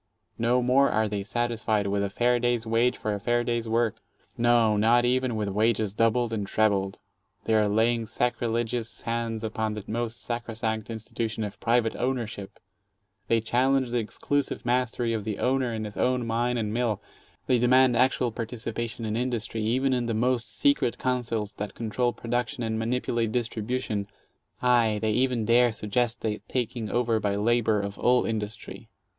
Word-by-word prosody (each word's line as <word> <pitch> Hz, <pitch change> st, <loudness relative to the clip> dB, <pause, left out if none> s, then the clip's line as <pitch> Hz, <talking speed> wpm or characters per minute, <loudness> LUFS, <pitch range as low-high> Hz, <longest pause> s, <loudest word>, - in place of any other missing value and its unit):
No 120 Hz, +2 st, +2 dB
more 135 Hz, +3 st, +4 dB
are 110 Hz, 0 st, +1 dB
they 105 Hz, -1 st, -2 dB
satisfied 110 Hz, -1 st, -1 dB
with 100 Hz, 0 st, 0 dB
"a 100 Hz, -, -1 dB
fair 120 Hz, +4 st, +2 dB
day's 120 Hz, -1 st, 0 dB
wage 115 Hz, +2 st, +2 dB
for 105 Hz, -, -2 dB
a 100 Hz, -, -3 dB
fair 120 Hz, +3 st, +1 dB
day's 120 Hz, -1 st, -1 dB
work"; 115 Hz, -1 st, +1 dB, 0.4 s
no, 115 Hz, -2 st, +3 dB
not 115 Hz, +3 st, +4 dB
even 125 Hz, -1 st, +1 dB
with 105 Hz, -2 st, -1 dB
wages 110 Hz, 0 st, +1 dB
doubled 115 Hz, +1 st, +1 dB
and 105 Hz, -3 st, -2 dB
trebled. 100 Hz, -3 st, +1 dB, 0.5 s
They 110 Hz, -, 0 dB
are 105 Hz, -1 st, +3 dB
laying 115 Hz, +2 st, +2 dB
sacriligious 120 Hz, 0 st, -2 dB
hands 115 Hz, -1 st, -2 dB
upon 110 Hz, -1 st, -2 dB
the 105 Hz, -, -6 dB
most 120 Hz, +1 st, -3 dB
sacrosanct 115 Hz, -2 st, -3 dB
institution 110 Hz, 0 st, -4 dB
of 105 Hz, -, -6 dB
private 115 Hz, -1 st, +1 dB
ownership, 115 Hz, -6 st, -3 dB, 0.7 s
they 115 Hz, +1 st, +2 dB
challenge 130 Hz, +2 st, +1 dB
the 120 Hz, -, +1 dB
exclusive 140 Hz, +6 st, -2 dB
mastery 120 Hz, -1 st, 0 dB
of 110 Hz, -2 st, -2 dB
the 105 Hz, -1 st, -3 dB
owner 130 Hz, -1 st, +1 dB
in 110 Hz, -1 st, -3 dB
his 105 Hz, -, -8 dB
own 125 Hz, -1 st, +1 dB
mine 120 Hz, +2 st, 0 dB
and 105 Hz, -2 st, -2 dB
mill, 115 Hz, -3 st, 0 dB, 0.5 s
they 125 Hz, -2 st, +3 dB
demand 125 Hz, +1 st, +5 dB
actual 125 Hz, 0 st, +2 dB
participation 115 Hz, 0 st, -4 dB
in 110 Hz, 0 st, -2 dB
industry, 120 Hz, -2 st, -2 dB
even 130 Hz, +5 st, +1 dB
in 120 Hz, -2 st, 0 dB
the 115 Hz, -, -1 dB
most 120 Hz, 0 st, 0 dB
secret 140 Hz, -4 st, +2 dB
councils 115 Hz, -5 st, -2 dB
that 105 Hz, 0 st, -5 dB
control 120 Hz, +2 st, 0 dB
production 120 Hz, 0 st, -3 dB
and 110 Hz, -1 st, -1 dB
manipulate 115 Hz, -1 st, -1 dB
dis 120 Hz, 0 st, 0 dB
tribution, 110 Hz, -3 st, -3 dB, 0.3 s
— -, -, -47 dB
aye 120 Hz, -4 st, +3 dB
,they 110 Hz, 0 st, 0 dB
even 125 Hz, -1 st, +1 dB
dare 120 Hz, +1 st, +4 dB
suggest 110 Hz, +2 st, -1 dB
the 105 Hz, -1 st, -2 dB
taking 120 Hz, -3 st, -2 dB
over 120 Hz, -1 st, +1 dB
by 100 Hz, -2 st, 0 dB
labor 110 Hz, 0 st, +2 dB
of 100 Hz, 0 st, -5 dB
all 125 Hz, 0 st, +3 dB
industry. 110 Hz, -1 st, -5 dB
115 Hz, 170 wpm, -27 LUFS, 110-120 Hz, 0.7 s, demand